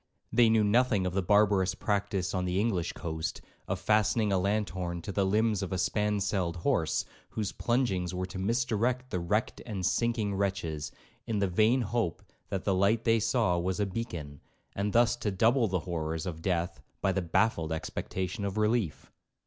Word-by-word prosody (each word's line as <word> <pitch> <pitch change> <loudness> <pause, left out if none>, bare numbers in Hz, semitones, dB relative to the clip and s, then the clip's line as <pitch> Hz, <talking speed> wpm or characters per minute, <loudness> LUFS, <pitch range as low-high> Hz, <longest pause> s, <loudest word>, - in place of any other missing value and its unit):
They 115 -1 +6
knew 110 -1 +4
nothing 105 -2 +3
of 90 - -1
the 95 - +1
barbarous 100 -1 +3
practice 100 -3 -1
on 90 -1 0
the 90 +1 0
English 100 -6 0
coast, 80 -2 -4 0.3
of 95 - -2
fastening 105 +2 +2
a 95 - +3
lanthorn 90 -4 -1
to - - -4
the 100 0 +1
limbs 105 0 +2
of 95 - -4
a 95 - -1
spanselled 100 -2 0
horse, 85 - 0 0.2
whose 105 -3 -3
plungings 100 -8 0
were 90 0 -2
to 95 0 -7
misdirect 120 +4 0
the 90 - -1
wrecked 105 +6 -1
and 100 -6 -4
sinking 115 -2 +1
wretches, 95 -6 -2 0.4
in 110 - -1
the 100 -1 +2
vain 110 +8 +3
hope 115 -5 -1 0.3
that 95 - -2
the 100 - +1
light 100 +5 +2
they 115 0 +3
saw 105 -6 +2
was 95 +3 -1
a 105 - +2
beacon, 90 - -5 0.3
and 100 +1 -1
thus 120 +2 +4
to 110 - -1
double 115 +5 +3
the 90 -3 -1
horrors 80 -1 -3
of 80 -3 -5
death 85 -1 -1 0.2
by 95 - +2
the 95 - 0
baffled 85 -2 +1
expectation 90 +5 -3
of 100 +1 -3
relief. 105 - 0
100 Hz, 180 wpm, -30 LUFS, 90-110 Hz, 0.4 s, They